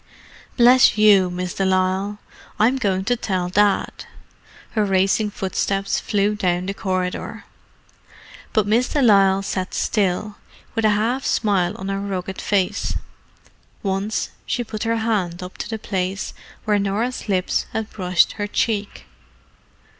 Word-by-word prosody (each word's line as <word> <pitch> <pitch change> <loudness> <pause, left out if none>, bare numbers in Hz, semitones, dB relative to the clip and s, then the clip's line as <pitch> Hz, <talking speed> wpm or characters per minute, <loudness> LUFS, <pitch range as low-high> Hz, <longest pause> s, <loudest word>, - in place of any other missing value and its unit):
Bless 245 -1 +6
you, 205 -3 +6
Miss 180 0 -4
de 195 - -1
Lisle! 190 +2 +1 0.4
I'm 230 +5 +3
going 190 -6 0
to 245 - +2
tell 185 -6 -2
Dad." 205 +2 +1 0.7
Her 215 - +1
racing 195 +2 +2
footsteps 195 0 -1
flew 205 0 0
down 180 -3 0
the 195 - -2
corridor. 185 -2 -3 1.1
But 215 -2 +2
Miss 230 +5 +2
de 295 - 0
Lisle 195 -3 +5
sat 185 -1 -3
still, 205 0 0 0.4
with 225 -1 0
a - - +5
half 240 +5 0
smile 190 -5 +1
on 190 +1 -5
her 195 0 -1
rugged 190 -1 -4
face. 200 0 0 0.9
Once 195 +2 -1 0.2
she 245 - -1
put 215 -2 -7
her 230 0 +1
hand 195 -6 -1
up 180 - -10
to - - -4
the 220 - -3
place 190 -2 -3 0.3
where 210 -1 +2
Norah's 210 +5 -2
lips 185 -2 0
had 220 -1 -4
brushed 180 -3 +2
her 205 - -4
cheek. 210 -1 -2
200 Hz, 140 wpm, -21 LUFS, 185-215 Hz, 1.1 s, Bless